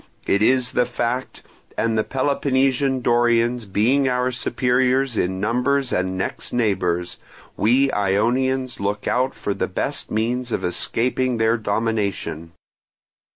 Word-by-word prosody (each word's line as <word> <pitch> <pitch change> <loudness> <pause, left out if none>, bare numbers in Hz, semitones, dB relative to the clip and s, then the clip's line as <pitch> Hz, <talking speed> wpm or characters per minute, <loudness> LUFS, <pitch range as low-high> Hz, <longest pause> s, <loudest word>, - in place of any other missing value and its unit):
It 100 - +1
is 125 +2 +3
the 125 - +1
fact; 125 +1 -3 0.3
and 115 0 +1
the 110 - +2
Peloponnesian 135 0 +1
Dorians 120 0 +2
being 130 +8 +2
our 125 0 0
superiors 125 +1 +1
in 95 -2 -1
numbers 125 +5 0
and 95 0 -1
next 95 +2 -4
neighbours, 90 -7 0 0.4
we 130 +5 +3
Ionians 120 +6 0
looked 100 +1 -2
out 130 +1 +1
for 100 - -3
the - - -2
best - - -3
means 120 +3 -1
of - - -1
escaping 125 +7 0
their 110 +1 +2
domination. 100 -7 -2
120 Hz, 125 wpm, -22 LUFS, 105-130 Hz, 0.4 s, is